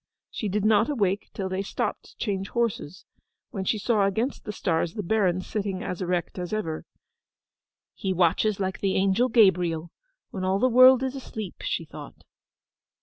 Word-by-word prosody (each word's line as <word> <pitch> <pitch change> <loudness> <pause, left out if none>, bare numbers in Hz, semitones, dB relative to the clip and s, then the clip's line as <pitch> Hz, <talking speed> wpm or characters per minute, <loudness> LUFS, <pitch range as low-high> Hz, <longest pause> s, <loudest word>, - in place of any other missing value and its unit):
She 210 - -3
did 205 +2 -1
not 220 +3 +4
awake 205 -8 0
till 195 - -4
they 190 +1 -2
stopped 200 - -3
to - - -18
change 195 -3 -2
horses; 225 -8 -2 0.5
when 190 -2 -4
she 215 - +1
saw 210 -2 +2
against 225 +7 -2
the 210 - -3
stars 170 -4 -1
the 210 - -3
Baron 185 -2 +1
sitting 195 -2 -3
as 180 - -4
erect 180 0 -2
as 180 -1 -5
ever. 200 -8 -3 1.1
'He 190 - -3
watches 185 +4 +2
like 190 -1 -2
the 195 -1 0
Angel 195 +6 +2
Gabriel, 175 -7 +3 0.4
when 190 - -5
all 190 +1 +1
the 250 +5 +3
world 255 +1 +7
is 260 -1 -2
asleep!' 220 -7 -7
she - - -2
thought. - - -11
195 Hz, 170 wpm, -26 LUFS, 185-220 Hz, 1.1 s, world